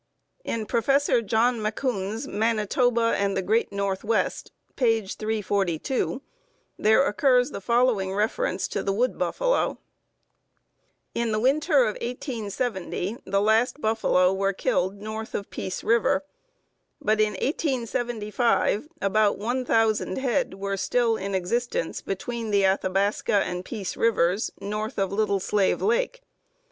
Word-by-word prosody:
In 225 -2 -3
Prof. 230 +1 -1 0.4
John 230 +2 +2
Macoun's 215 -1 -2
"Manitoba 230 +2 +1
and 200 -1 0
the 190 - 0
Great 220 +4 +1
Northwest," 200 +2 -1 0.2
page 225 -6 +1
342, 210 - -1 0.6
there 220 +6 +4
occurs 250 +3 +3
the - - -6
following 235 -4 +2
reference 220 - -1
to - - -2
the 195 - -1
wood 245 +5 0
buffalo: - - 0 1.4
"In 235 -1 -1
the 215 - +1
winter 280 +3 +3
of 215 -3 -1
1870 230 - -3
the 195 +1 +1
last 220 +6 +2
buffalo 215 -6 +2
were 195 +1 0
killed 190 +1 -1
north 220 +1 -6
of 200 - -5
Peace 185 - -5
River; 275 +5 +2 0.7
but 215 +1 +2
in 210 -1 +2
1875 240 - 0 0.2
about 205 +1 +2
one 245 +6 -1
thousand 225 -5 +1
head 265 -4 0
were 195 0 -3
still 230 +4 +1
in 195 -1 -3
existence 190 0 -1
between 225 +4 -4
the 200 -1 +3
Athabasca 195 +2 +1
and 180 0 -4
Peace 200 -2 -5
Rivers, 200 -2 +2
north 210 +2 -4
of 195 -1 0
Little 200 -1 +1
Slave 195 +1 +1
Lake. - - 0
220 Hz, 125 wpm, -25 LUFS, 200-240 Hz, 1.4 s, there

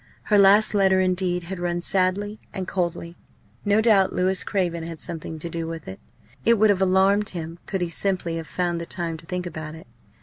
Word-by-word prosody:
Her 210 - +3
last 200 +3 +6
letter 190 -2 +4
indeed 180 -1 0
had 185 +1 -6
rung 175 0 -1
sadly 195 +4 0
and 190 -3 -5
coldly. 170 -2 -3 0.5
No 205 +1 +3
doubt 210 -4 +4
Louis 185 +1 +1
Craven 175 -4 -1
had 165 -1 -7
something 160 -1 -6
to 155 - -6
do 165 -1 -4
with 165 -2 -7
it. 95 - -8 0.4
It 235 - +5
would 215 -1 +4
have 195 -1 0
alarmed 195 +3 +3
him 165 -1 -6
could 190 -2 -2
he 175 - -1
simply 175 -1 -1
have 165 -1 -6
found 175 -2 -2
the 170 - -6
time 170 -2 -3
to 165 +1 -14
think 180 0 -3
about 155 -2 -6
it. 160 - -12
180 Hz, 205 wpm, -24 LUFS, 170-195 Hz, 0.5 s, last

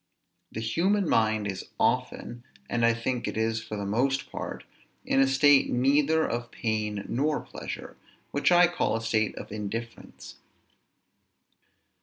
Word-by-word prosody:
The 110 - -5
human 185 - +1
mind 110 -4 +2
is 95 -2 -5
often, 120 0 -1 0.2
and 120 0 -1
I 115 - +6
think 115 +1 -2
it - - -4
is 110 0 0
for 110 - -6
the 100 - -3
most 130 +7 0
part, - - -6 0.4
in - - +2
a 135 - +5
state 135 +1 +5
neither 145 +5 +3
of 120 0 -3
pain 105 -3 -2
nor 145 +5 0
pleasure, - - -8 0.4
which 145 +5 +2
I 175 0 +7
call 175 -10 0
a 115 - -2
state 110 -2 0
of - - -9
indifference. 110 +3 -7
115 Hz, 145 wpm, -27 LUFS, 110-140 Hz, 0.4 s, I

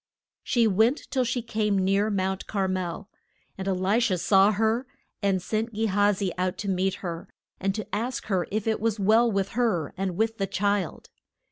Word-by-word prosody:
She 235 -2 +2
went 220 +7 +2
till 260 -2 +2
she 245 0 -2
came 215 -3 0
near 195 +3 +2
Mount 190 -1 -1
Car 195 -2 0
mel. 185 +1 -3 0.5
And 190 0 -6
E - - +2
li 190 +4 +1
sha 235 -6 +2
saw 195 +3 +4
her, 225 +4 0 0.3
and 195 -2 +2
sent 220 +3 -2
Ge 220 +1 0
ha 205 0 +3
zi 195 -2 -2
out 185 0 -1
to 205 - -5
meet 190 0 0
her, 170 -1 -5 0.3
and 195 +1 -1
to 215 - -4
ask 235 +5 -2
her 185 -4 0
if 215 0 -2
it 220 -1 0
was 225 -1 0
well 225 +4 +4
with 195 -1 0
her 215 - 0
and 190 -2 -2
with 225 +1 0
the 195 - 0
child. 200 -2 -1
200 Hz, 200 wpm, -26 LUFS, 190-220 Hz, 0.5 s, saw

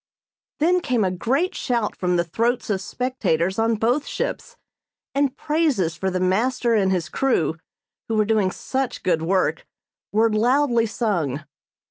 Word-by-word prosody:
Then 350 +4 +3
came 250 -9 0
a 185 - +1
great 265 - 0
shout 235 -5 -1
from 180 -1 0
the 170 - +2
throats 230 +7 -1
of 190 -2 -1
spectators 190 -7 -1
on 225 0 +2
both 245 +7 0
ships, - - -4 0.6
and 280 -1 0
praises 290 - +1
for 190 +2 -1
the 185 0 -2
master 230 +6 +1
and 195 -4 +3
his 180 -3 0
crew 165 - 0 0.5
who 225 - -1
were 215 -1 +3
doing 215 -3 +2
such 260 +6 -3
good 170 -3 +1
work 185 +3 +1 0.5
were 220 +1 +3
loudly 240 +1 +3
sung. 170 - -1
220 Hz, 150 wpm, -23 LUFS, 185-255 Hz, 0.6 s, Then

